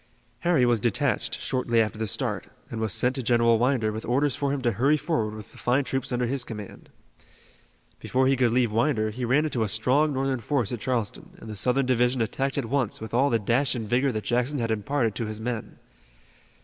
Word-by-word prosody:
Harry 165 Hz, -4 st, +3 dB
was 120 Hz, -2 st, +3 dB
detached 120 Hz, +5 st, 0 dB
shortly 125 Hz, -3 st, 0 dB
after 110 Hz, -1 st, 0 dB
the 110 Hz, -, -1 dB
start, -, -, -2 dB, 0.2 s
and 115 Hz, -, -4 dB
was 110 Hz, -2 st, -1 dB
sent 125 Hz, +5 st, +2 dB
to 135 Hz, -, -3 dB
General 115 Hz, -1 st, +3 dB
Winder 120 Hz, -3 st, +1 dB
with 110 Hz, +1 st, -5 dB
orders 135 Hz, +3 st, +1 dB
for 140 Hz, -1 st, -1 dB
him 140 Hz, -, -1 dB
to 120 Hz, -, +2 dB
hurry 135 Hz, +8 st, +2 dB
forward 115 Hz, -10 st, -1 dB
with 105 Hz, -2 st, -10 dB
the -, -, -15 dB
fine 130 Hz, +3 st, +2 dB
troops 135 Hz, 0 st, -2 dB
under 125 Hz, 0 st, 0 dB
his 130 Hz, +1 st, -1 dB
command. 105 Hz, -4 st, -9 dB, 1.1 s
Before 130 Hz, +1 st, +1 dB
he 135 Hz, +1 st, +4 dB
could 125 Hz, -3 st, +2 dB
leave 120 Hz, -2 st, +2 dB
Winder 110 Hz, -1 st, +1 dB
he 125 Hz, +3 st, -4 dB
ran 140 Hz, +6 st, +3 dB
into 130 Hz, -6 st, -2 dB
a 110 Hz, -, +1 dB
strong 130 Hz, +9 st, +2 dB
Northern 135 Hz, -1 st, -1 dB
force 120 Hz, -1 st, -1 dB
at 120 Hz, -, -3 dB
Charleston, 115 Hz, -3 st, -3 dB
and -, -, -12 dB
the -, -, -6 dB
Southern 125 Hz, +5 st, +2 dB
division 125 Hz, 0 st, +2 dB
attacked 135 Hz, +5 st, -1 dB
at 140 Hz, -, -1 dB
once 125 Hz, -2 st, -1 dB
with 110 Hz, +1 st, -8 dB
all 135 Hz, +4 st, +3 dB
the 115 Hz, -, +3 dB
dash 120 Hz, +5 st, +1 dB
and 115 Hz, -3 st, -4 dB
vigor 130 Hz, +4 st, +2 dB
that 110 Hz, -3 st, -3 dB
Jackson 125 Hz, +4 st, 0 dB
had 115 Hz, -3 st, -1 dB
imparted 115 Hz, +2 st, 0 dB
to 115 Hz, 0 st, -3 dB
his 110 Hz, 0 st, -6 dB
men. 115 Hz, -1 st, -4 dB
120 Hz, 220 wpm, -26 LUFS, 110-135 Hz, 1.1 s, he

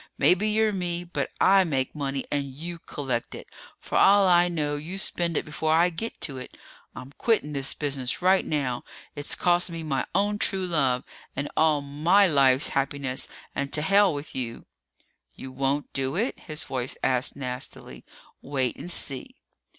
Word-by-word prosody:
Maybe 195 Hz, +4 st, +3 dB
you're 215 Hz, 0 st, +2 dB
me, 175 Hz, -2 st, -2 dB
but 175 Hz, -, -3 dB
I 195 Hz, 0 st, +6 dB
make 135 Hz, -7 st, -1 dB
money 140 Hz, -2 st, -3 dB
and 145 Hz, -1 st, 0 dB
you 165 Hz, +6 st, -7 dB
collect 130 Hz, -7 st, -4 dB
it. -, -, -9 dB, 0.3 s
For -, -, -1 dB
all 200 Hz, 0 st, +6 dB
I 175 Hz, -1 st, +5 dB
know 150 Hz, -4 st, -1 dB
you 160 Hz, +6 st, -5 dB
spend 175 Hz, -4 st, 0 dB
it -, -, -1 dB
before 155 Hz, +1 st, -1 dB
I 170 Hz, +2 st, +4 dB
get 225 Hz, +8 st, -5 dB
to 135 Hz, -4 st, -2 dB
it! 130 Hz, -, -10 dB, 0.4 s
I'm 130 Hz, -, -9 dB
quitting 215 Hz, -11 st, +1 dB
this 135 Hz, -1 st, 0 dB
business 135 Hz, -3 st, -1 dB
right 185 Hz, +1 st, +4 dB
now. 135 Hz, -5 st, -2 dB, 0.3 s
It's 145 Hz, 0 st, -3 dB
cost 175 Hz, 0 st, +2 dB
me 165 Hz, -1 st, -6 dB
my 140 Hz, -4 st, -1 dB
own 205 Hz, +2 st, +1 dB
true 190 Hz, -1 st, +2 dB
love 135 Hz, -8 st, +1 dB, 0.3 s
and 140 Hz, +2 st, -3 dB
all 155 Hz, -2 st, +3 dB
my 155 Hz, +8 st, +3 dB
life's 140 Hz, -4 st, +4 dB
happiness 135 Hz, -1 st, -1 dB, 0.3 s
and 140 Hz, 0 st, -3 dB
to 150 Hz, -, 0 dB
hell 200 Hz, +2 st, +5 dB
with 145 Hz, +1 st, -6 dB
you!" 120 Hz, -3 st, -4 dB, 0.7 s
"You 130 Hz, -, -9 dB
won't 135 Hz, +2 st, -1 dB
do 135 Hz, +1 st, -1 dB
it?" 225 Hz, +8 st, -1 dB
his 155 Hz, -2 st, -3 dB
own -, -, -12 dB
voice 130 Hz, -1 st, -2 dB
asked 130 Hz, +1 st, +1 dB
nastily. 125 Hz, -1 st, -6 dB, 0.4 s
"Wait 130 Hz, -3 st, -2 dB
and 175 Hz, -, -7 dB
see!" 135 Hz, -6 st, -1 dB
150 Hz, 175 wpm, -26 LUFS, 135-175 Hz, 0.7 s, I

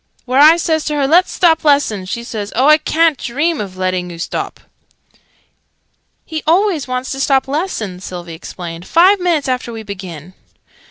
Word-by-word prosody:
"When 260 Hz, +2 st, +2 dB
I 315 Hz, +3 st, +8 dB
says 320 Hz, -2 st, 0 dB
to 300 Hz, -, -2 dB
her 285 Hz, -2 st, +1 dB
'Let's 345 Hz, +5 st, +4 dB
stop 330 Hz, -3 st, +2 dB
lessons!', 255 Hz, -11 st, +1 dB
she 235 Hz, +3 st, -4 dB
says 210 Hz, -3 st, -6 dB
'Oh, 255 Hz, +4 st, +2 dB
I 305 Hz, +1 st, +6 dB
ca'n't 320 Hz, -1 st, +1 dB
dream 295 Hz, +5 st, -1 dB
of 190 Hz, -3 st, -7 dB
letting 185 Hz, -1 st, -2 dB
oo 170 Hz, -, -9 dB
stop 165 Hz, -, -4 dB, 0.5 s
yet!'" -, -, -32 dB, 1.0 s
"He 315 Hz, -1 st, -5 dB
always 345 Hz, -3 st, +2 dB
wants 255 Hz, +1 st, -3 dB
to 270 Hz, -, -4 dB
stop 270 Hz, -1 st, +2 dB
lessons," 250 Hz, -, -3 dB
Sylvie 175 Hz, -2 st, -7 dB
explained, 170 Hz, +1 st, -8 dB
"five 375 Hz, +4 st, +4 dB
minutes 335 Hz, -6 st, 0 dB
after 250 Hz, -2 st, -2 dB
we 225 Hz, -1 st, -7 dB
begin!" 185 Hz, -5 st, -9 dB
265 Hz, 175 wpm, -16 LUFS, 190-315 Hz, 1.0 s, I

